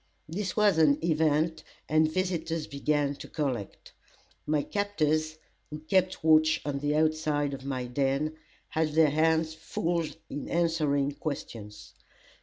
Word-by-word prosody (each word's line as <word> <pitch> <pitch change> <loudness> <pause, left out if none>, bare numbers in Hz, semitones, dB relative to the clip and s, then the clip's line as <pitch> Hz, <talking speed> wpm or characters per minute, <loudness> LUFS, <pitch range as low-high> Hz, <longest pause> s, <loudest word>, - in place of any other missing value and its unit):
This 190 +6 -4
was 205 -6 +4
an 145 -3 +5
event, 160 0 +1 0.2
and 155 0 +3
visitors 165 -3 -1
began 145 0 0
to - - -9
collect. 130 -9 -4 0.5
My 150 -1 +1
captors, 155 -6 0 0.3
who 150 - -6
kept 185 +4 0
watch 155 0 +5
on 140 -1 -2
the 145 +1 0
outside 155 -2 +1
of 135 0 -7
my 130 -2 -2
den, 140 +4 0 0.3
had 160 -1 0
their 155 -2 +5
hands 160 +1 +2
full 165 +1 -2 0.2
in 145 - -6
answering 155 -5 +1
questions. 115 -8 -7
155 Hz, 130 wpm, -28 LUFS, 145-160 Hz, 0.5 s, an